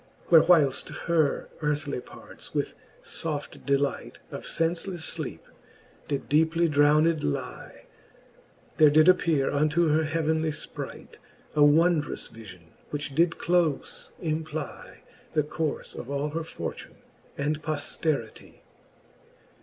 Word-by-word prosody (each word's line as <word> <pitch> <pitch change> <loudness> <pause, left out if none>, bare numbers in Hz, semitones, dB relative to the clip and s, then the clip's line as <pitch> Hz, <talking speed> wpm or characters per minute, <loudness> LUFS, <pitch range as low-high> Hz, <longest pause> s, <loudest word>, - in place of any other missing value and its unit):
Where 165 -2 +9
whileft 155 -7 +3 0.2
her 160 -4 +1
earthly 150 -2 -1
parts - - -12
with - - -1 0.3
foft 150 -3 -4
delight 140 0 0
Of - - -7
(encelefle 170 +3 -1
fleepe 160 - -5 0.6
did 140 -2 -3
deeply 160 +3 +3
drowned 150 +2 +4
lie, 70 - -4 0.9
There 155 -1 +7
did 155 +1 +5
appeare 165 -7 +3
unto 155 +3 +2
her 155 +1 +3
heavenly 160 0 0
ipright 155 - -7 0.4
A 150 - +5
wondrous 155 +1 +3
vifion, 95 -7 -12 0.2
which 145 -1 -4
did 165 +3 +2
clofe 170 -5 0
implie 155 -2 -5 0.3
The 155 -2 +2
courfe 150 0 -3
of 125 - -8
all 140 +1 -1
her 165 +2 -3
fortune 160 - -7 0.4
and 150 +2 -1
pofteritie. 150 -5 -3
155 Hz, 115 wpm, -27 LUFS, 145-165 Hz, 0.9 s, Where